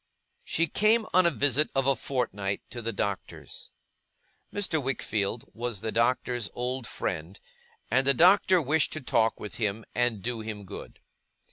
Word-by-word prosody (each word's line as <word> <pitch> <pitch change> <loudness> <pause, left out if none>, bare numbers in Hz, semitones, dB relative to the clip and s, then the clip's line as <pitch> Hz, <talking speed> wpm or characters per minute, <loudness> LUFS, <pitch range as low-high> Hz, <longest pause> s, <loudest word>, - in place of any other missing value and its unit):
She 165 - 0
came 215 +7 +2
on 185 -1 +6
a - - +5
visit 145 -1 +3
of 135 -1 +2
a 135 0 +4
fortnight 105 -8 -2
to 120 - -5
the 115 0 -2
Doctor's. 100 -2 -5 0.8
Mr. 180 -6 0
Wickfield 115 -4 -2
was 115 -4 -4
the 110 - -2
Doctor's 120 -1 0
old 125 0 -2
friend, 85 +2 -4 0.5
and 130 +3 +3
the 140 - +6
Doctor 185 +3 +6
wished 155 +1 +2
to 155 - -4
talk 115 -3 +1
with 105 - -7
him, 110 0 -2
and 120 -5 0
do 120 +1 -2
him 110 -2 -6
good. - - -9
120 Hz, 155 wpm, -28 LUFS, 110-145 Hz, 0.8 s, on